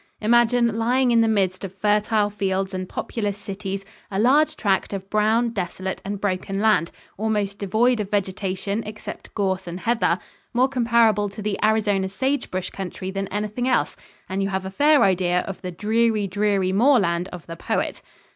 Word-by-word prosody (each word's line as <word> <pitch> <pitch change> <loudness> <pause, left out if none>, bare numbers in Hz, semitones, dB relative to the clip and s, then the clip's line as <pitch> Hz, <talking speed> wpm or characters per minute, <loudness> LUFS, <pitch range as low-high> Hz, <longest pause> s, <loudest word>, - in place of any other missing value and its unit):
Imagine, 235 0 +3
lying 250 +2 +2
in 230 -1 +5
the 225 - +3
midst 195 -4 +1
of 195 0 -7
fertile 210 +1 +2
fields 195 -1 -1
and 185 0 -4
populous 205 -3 -3
cities, 195 -1 -5 0.2
a 195 - -3
large 270 +8 +4
tract 195 -1 0
of 195 -1 -5
brown, 220 +3 +2
desolate 190 -3 -4
and 200 0 -4
broken 195 0 -2
land, 210 -5 +3 0.3
almost 210 -2 -1
devoid 220 +5 +2
of 205 -2 -3
vegetation 195 +1 -2
except 210 0 -8
gorse 190 -3 -1
and 175 +2 -6
heather, 225 -7 +2 0.4
more 255 +2 +4
comparable 235 -5 +3
to 200 +1 -8
the 210 -1 -2
Arizona 205 -3 +2
sagebrush 245 -4 -2
country 190 0 -5
than 195 0 -3
anything 210 +5 -2
else, 255 - +1 0.3
and 190 +1 -2
you 195 - 0
have 190 -1 -2
a 190 - -5
fair 290 +8 +4
idea 180 -2 +2
of 195 - -7
the 185 - -4
"dreary, 215 +3 +1
dreary 195 -1 +1
moorland" 195 -7 +3
of 180 -3 -9
the 165 - -7
poet. - - -2
205 Hz, 170 wpm, -23 LUFS, 190-225 Hz, 0.4 s, in